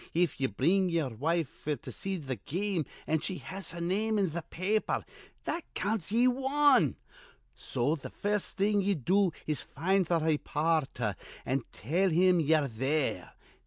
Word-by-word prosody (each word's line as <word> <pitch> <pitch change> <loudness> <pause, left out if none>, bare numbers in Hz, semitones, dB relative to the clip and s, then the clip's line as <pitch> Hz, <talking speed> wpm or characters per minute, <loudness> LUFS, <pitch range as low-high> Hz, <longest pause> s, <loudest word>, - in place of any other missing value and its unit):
If 170 -5 +1
ye 135 - +3
bring 175 - +2
ye'er 165 -5 0
wife 160 +5 -1
f'r 150 -1 -1
to - - -8
see 195 -1 -3
th' 130 -8 -5
game, 185 -1 -1 0.2
an' 160 - +1
she 185 +4 -3
has 190 -2 -5
her 170 - -6
name 210 +5 +1
in 195 -5 +1
th' 170 +1 -5
paper, 205 +5 0 0.4
that 340 - -2
counts 205 -4 -1
ye 240 +3 +4
wan. 270 +2 +3 0.6
So 135 +5 -1
th' 145 - -8
first 205 -2 -1
thing 205 +1 +3
ye 200 +1 +1
do 185 +6 +2
is 150 -5 0
to - - -14
find 185 +5 +1
th' 170 - +3
raypoorter, 150 -7 0 0.3
an' 130 -1 -1
tell 175 - +1
him 180 +1 +4
ye're 155 -2 +3
there. 130 -4 -1
170 Hz, 165 wpm, -30 LUFS, 150-195 Hz, 0.6 s, ye